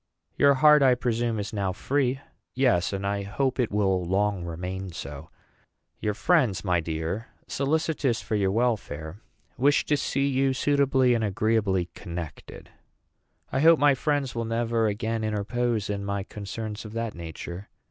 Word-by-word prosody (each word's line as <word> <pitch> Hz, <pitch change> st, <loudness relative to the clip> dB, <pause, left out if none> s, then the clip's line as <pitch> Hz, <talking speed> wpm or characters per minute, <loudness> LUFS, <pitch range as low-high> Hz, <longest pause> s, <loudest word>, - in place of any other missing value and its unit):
"Your 140 Hz, -1 st, +5 dB
heart, 150 Hz, +2 st, +6 dB
I 130 Hz, -2 st, +5 dB
presume, 120 Hz, -2 st, -1 dB
is 100 Hz, +1 st, -5 dB
now 100 Hz, -3 st, -1 dB
free." 135 Hz, +4 st, 0 dB, 0.4 s
"Yes, 125 Hz, -10 st, +2 dB
and 100 Hz, 0 st, -3 dB
I 100 Hz, 0 st, -1 dB
hope 130 Hz, +7 st, -1 dB
it 120 Hz, -, +1 dB
will 95 Hz, -3 st, +1 dB
long 95 Hz, +1 st, 0 dB
remain 90 Hz, +3 st, -5 dB
so." 75 Hz, -2 st, -8 dB, 0.7 s
"Your 105 Hz, -1 st, -1 dB
friends, 125 Hz, -, +2 dB
my 90 Hz, -2 st, +2 dB
dear, 80 Hz, +7 st, -3 dB, 0.2 s
solicitous 145 Hz, -3 st, 0 dB
for -, -, -6 dB
your 100 Hz, -2 st, +2 dB
welfare, 95 Hz, -6 st, -2 dB, 0.4 s
wish 145 Hz, +3 st, +3 dB
to 150 Hz, -, +2 dB
see 140 Hz, -1 st, 0 dB
you 135 Hz, 0 st, +2 dB
suitably 135 Hz, -2 st, +3 dB
and 115 Hz, -2 st, 0 dB
agreeably 100 Hz, -3 st, +1 dB
connected." 85 Hz, -3 st, -8 dB, 0.8 s
"I 135 Hz, -, 0 dB
hope 165 Hz, +3 st, +7 dB
my 145 Hz, -1 st, +5 dB
friends 140 Hz, -1 st, -1 dB
will 115 Hz, -1 st, -2 dB
never 115 Hz, 0 st, 0 dB
again 110 Hz, +2 st, -2 dB
interpose 110 Hz, +1 st, -1 dB
in 100 Hz, -1 st, -3 dB
my 100 Hz, 0 st, -2 dB
concerns 105 Hz, +2 st, -6 dB
of 105 Hz, -1 st, -9 dB
that 115 Hz, -1 st, -3 dB
nature. 85 Hz, +3 st, -8 dB
110 Hz, 155 wpm, -26 LUFS, 95-130 Hz, 0.8 s, hope